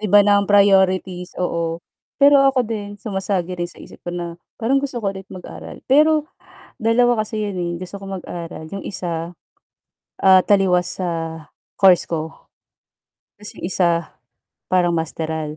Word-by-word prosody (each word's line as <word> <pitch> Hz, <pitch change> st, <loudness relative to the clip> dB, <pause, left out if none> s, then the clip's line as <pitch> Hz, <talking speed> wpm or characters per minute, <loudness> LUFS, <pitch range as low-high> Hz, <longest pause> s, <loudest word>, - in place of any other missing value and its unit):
Iba 205 Hz, -1 st, +5 dB
na 205 Hz, 0 st, +4 dB
ang 200 Hz, -, -4 dB
priorities, 190 Hz, -3 st, +3 dB
oo. 170 Hz, -1 st, -2 dB, 0.3 s
Pero 285 Hz, 0 st, +6 dB
ako 270 Hz, -2 st, +3 dB
din, 205 Hz, -2 st, -5 dB
sumasagi 190 Hz, -4 st, -3 dB
rin 175 Hz, 0 st, -2 dB
sa -, -, -13 dB
isip -, -, -13 dB
ko 175 Hz, -, -3 dB
na, 170 Hz, -1 st, -5 dB, 0.2 s
parang 255 Hz, +5 st, +1 dB
gusto 270 Hz, -4 st, -4 dB
ko 200 Hz, -, 0 dB
ulit 195 Hz, 0 st, -9 dB
mag-aral. 185 Hz, -2 st, -10 dB
Pero, 305 Hz, +2 st, +4 dB, 0.5 s
2 240 Hz, +1 st, +3 dB
kasi 215 Hz, 0 st, -3 dB
'yon, 200 Hz, -3 st, -3 dB
eh, 175 Hz, -1 st, -2 dB
gusto 185 Hz, +2 st, -7 dB
ko 195 Hz, -, -11 dB
mag-aral, 170 Hz, -3 st, -7 dB
'yong 195 Hz, -1 st, -6 dB
isa, 170 Hz, -2 st, -4 dB, 0.9 s
ah, 190 Hz, -1 st, +7 dB
taliwas 185 Hz, -3 st, +2 dB
sa 165 Hz, -3 st, -4 dB, 0.3 s
course 190 Hz, -3 st, +5 dB
ko, 160 Hz, -1 st, -5 dB, 0.9 s
tas 210 Hz, 0 st, -8 dB
'yong -, -, -12 dB
isa, 170 Hz, -3 st, +1 dB, 0.5 s
parang 175 Hz, -2 st, +2 dB
masteral. 160 Hz, -1 st, -3 dB
190 Hz, 150 wpm, -20 LUFS, 175-210 Hz, 0.9 s, ah